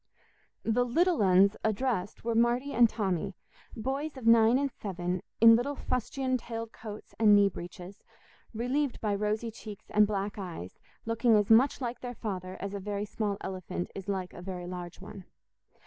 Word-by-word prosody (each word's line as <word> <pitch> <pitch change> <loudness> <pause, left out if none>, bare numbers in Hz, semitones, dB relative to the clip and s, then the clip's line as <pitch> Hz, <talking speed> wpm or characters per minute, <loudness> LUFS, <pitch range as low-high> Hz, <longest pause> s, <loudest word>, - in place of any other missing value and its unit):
The 230 +2 +2
"little 335 +5 +2
uns" 195 +1 +5
addressed 220 -2 -1
were 235 - +1
Marty 240 +4 +2
and 235 -1 +6
Tommy, 195 -3 -2 0.4
boys 270 +5 -3
of 255 - -8
nine 230 +1 +6
and 280 0 0
seven, 180 -4 -3 0.2
in 230 0 +9
little 270 +5 -1
fustian 255 +1 -1
tailed 230 -1 -6
coats 215 -1 -10
and 210 -2 +7
knee 200 -1 +5
breeches, 180 +2 -10 0.5
relieved 250 +4 -1
by 210 -2 0
rosy 210 +3 -1
cheeks 215 -2 -11
and 210 0 +5
black 205 0 -3
eyes, 170 - -7 0.3
looking 230 0 +3
as 210 0 +2
much 255 +5 +5
like 245 -1 -3
their 245 -1 -6
father 185 -4 -5
as 200 0 -5
a 200 - -3
very 205 +1 -3
small 205 -1 -2
elephant 185 -1 -5
is 195 0 -8
like 190 -2 -3
a - - -9
very 180 -1 -6
large 175 -1 -7
one. 195 - -10
215 Hz, 170 wpm, -30 LUFS, 195-240 Hz, 0.5 s, in